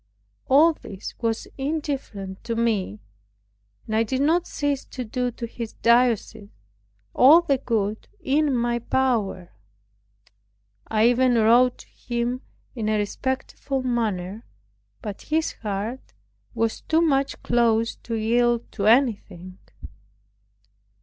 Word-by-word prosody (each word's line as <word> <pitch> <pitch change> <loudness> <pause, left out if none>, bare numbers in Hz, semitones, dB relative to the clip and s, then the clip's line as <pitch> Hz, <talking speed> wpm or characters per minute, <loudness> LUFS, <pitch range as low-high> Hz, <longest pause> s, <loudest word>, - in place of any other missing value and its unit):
All 305 +5 +6
this 195 -9 -9
was 225 -2 -2
indifferent 270 -10 -4
to 230 -1 -2
me; 210 - -1 0.8
and 220 - -3
I 220 - +3
did 255 +4 -1
not 330 +4 +2
cease 285 -2 -2
to 255 - -6
do 250 +3 -2
to 235 - -5
his 230 -1 -7
diocese 235 -4 +2 0.6
all 300 +7 +7
the 275 -6 0
good 220 -4 -2
in 290 -4 +1
my 240 0 0
power. 225 -8 -1 1.4
I 220 +1 +3
even 245 0 +3
wrote 235 +3 +4
to - - -15
him 240 +1 -3 0.3
in 220 -4 -2
a 215 - +2
respectful 260 +5 -3
manner; 220 -4 -2 0.6
but 210 -3 -6
his 315 +1 0
heart 215 +4 -4 0.4
was 225 -1 -1
too 320 +1 +1
much 275 -4 +1
closed 230 -1 +1
to 230 - -3
yield 235 +1 +1
to 205 -2 -2
anything. 205 -7 +1
235 Hz, 120 wpm, -24 LUFS, 215-265 Hz, 1.4 s, all